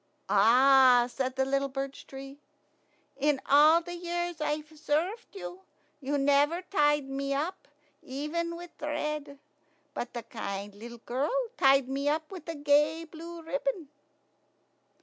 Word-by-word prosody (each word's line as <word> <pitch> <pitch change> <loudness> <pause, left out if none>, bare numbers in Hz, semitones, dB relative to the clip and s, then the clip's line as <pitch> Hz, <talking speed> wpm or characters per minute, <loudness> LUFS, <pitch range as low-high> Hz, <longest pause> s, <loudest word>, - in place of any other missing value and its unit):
"Ah!" 250 +3 +6
said 260 +1 -3
the 265 0 +1
little 275 +1 0
birch 270 0 -5
tree, 270 +1 -10 0.8
"in 285 0 +2
all 305 +4 +6
the 350 +1 -7
years 345 -1 -3
I've 300 +1 -3
served 345 - -2
you, 180 -1 -8 0.4
you 285 +1 -1
never 285 +5 +2
tied 295 -6 +2
me 275 +1 -2
up, 340 +7 -3 0.3
even 310 +6 -3
with 345 0 -9
thread; 300 -1 -3 0.6
but 240 - -5
the 235 - -4
kind 200 -3 -6
little 235 +4 -10
girl 260 +4 -1 0.3
tied 270 - +4
me 275 +2 -1
up 310 +2 -2
with 345 -4 -9
a 330 - -3
gay 295 +3 +2
blue 330 +1 -10
ribbon." 405 - -3
290 Hz, 135 wpm, -29 LUFS, 270-325 Hz, 0.8 s, Ah